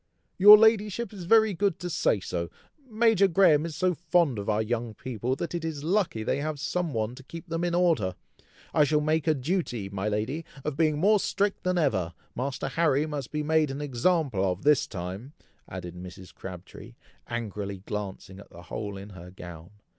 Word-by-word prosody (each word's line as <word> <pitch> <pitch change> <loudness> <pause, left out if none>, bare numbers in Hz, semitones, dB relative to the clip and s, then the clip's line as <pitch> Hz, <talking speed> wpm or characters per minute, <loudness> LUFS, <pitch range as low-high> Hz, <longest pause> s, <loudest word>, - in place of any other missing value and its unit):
"Your 210 +2 +11
ladyship 220 +1 +2
is 185 -4 -8
very 220 +2 +5
good 190 -1 0
to 180 - -5
say 165 - +1
so. 85 -2 -4 0.4
Major 220 -3 +4
Graham 165 -4 +4
is 160 - -7
so 185 +3 +1
fond 165 - +1
of 100 - -4
our 110 +1 +1
young 115 0 -3
people, 125 0 -3
that 170 +5 -5
it 170 -1 -3
is 155 -3 -4
lucky 175 - 0
they 135 - 0
have 150 0 -3
some 170 +2 -2
one 110 -1 -2
to 130 - -11
keep 165 +6 -10
them 165 +1 -2
in 175 -1 0
order. 160 - +2 0.6
I 150 - +5
shall 150 +1 +2
make 155 +1 0
a 155 - +4
duty, 130 - -2
my 100 +1 -2
lady, 110 +10 -2 0.2
of 150 -2 -2
being 155 -1 +2
more 205 +6 +4
strict 200 +1 -1
than 185 0 0
ever. 95 - 0 0.2
Master 130 +1 -3
Harry 155 -3 +2
must 145 -5 -5
be 150 0 -2
made 155 -1 +2
an 135 +1 -5
example 140 - 0
of 95 0 -1
this 150 -2 +4
time!" 95 +8 -7 0.4
added 90 -2 -7
Mrs. 90 +1 -10
Crabtree, 95 +5 -10 0.3
angrily 105 -4 -5
glancing 100 -2 -6
at 100 - -14
the 85 - -13
hole 100 +3 -5
in 100 +2 -9
her 90 -2 -11
gown. 85 -2 -10
145 Hz, 190 wpm, -27 LUFS, 105-170 Hz, 0.6 s, Your